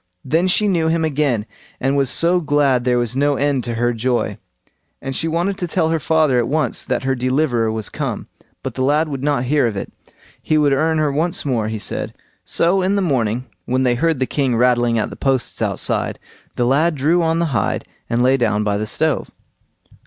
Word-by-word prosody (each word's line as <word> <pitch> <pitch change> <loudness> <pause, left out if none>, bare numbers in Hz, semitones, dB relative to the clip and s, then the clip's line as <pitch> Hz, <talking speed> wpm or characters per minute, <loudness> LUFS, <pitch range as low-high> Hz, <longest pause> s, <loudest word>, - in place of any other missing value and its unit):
Then 165 +7 +2
she 210 +3 +3
knew 170 -5 +1
him 160 0 +1
again, 140 -8 0 0.3
and 135 +2 0
was 135 -2 +2
so 175 +6 +3
glad 145 -5 +2
there 125 -1 +2
was 120 0 0
no 145 +1 +2
end 140 -2 0
to 120 -1 -3
her 120 +1 +1
joy, 115 -3 -1 0.6
and 135 0 -5
she 165 - 0
wanted 175 +5 -1
to 180 - -2
tell 160 0 +1
her 165 0 +1
father 155 -4 +2
at 120 - 0
once 150 -3 0
that - - -2
her 135 0 +1
deliverer 130 -3 0
was 110 -2 -3
come. - - -4 0.4
But - - -4
the 130 - -4
lad 150 +4 +2
would 135 -2 -5
not 145 -4 +1
hear 140 0 +2
of 105 -3 -4
it; - - -6 0.5
he 155 - +1
would 145 -2 +3
earn 160 +3 +1
her 155 -2 +1
once 165 +5 -1
more, 120 -6 0
he 110 0 -3
said. - - -3 0.3
So 180 +3 +1
in 190 +2 +1
the 200 - +1
morning 125 - 0 0.2
when 130 +1 0
they 125 -1 +3
heard 160 +5 +1
the 130 - +1
king 130 -3 0
rattling 120 -1 +2
at 110 - -1
the - - -7
posts 135 -5 -1
outside, - - -1 0.4
the 120 - +1
lad 155 +6 +2
drew 155 +6 +2
on 165 0 +1
the 170 - +1
hide, 100 -5 -1 0.2
and 120 +1 +1
lay 130 +2 +4
down 105 -4 +1
by 100 -1 0
the 105 +1 -3
stove. 155 +5 0
135 Hz, 215 wpm, -19 LUFS, 120-160 Hz, 0.6 s, lay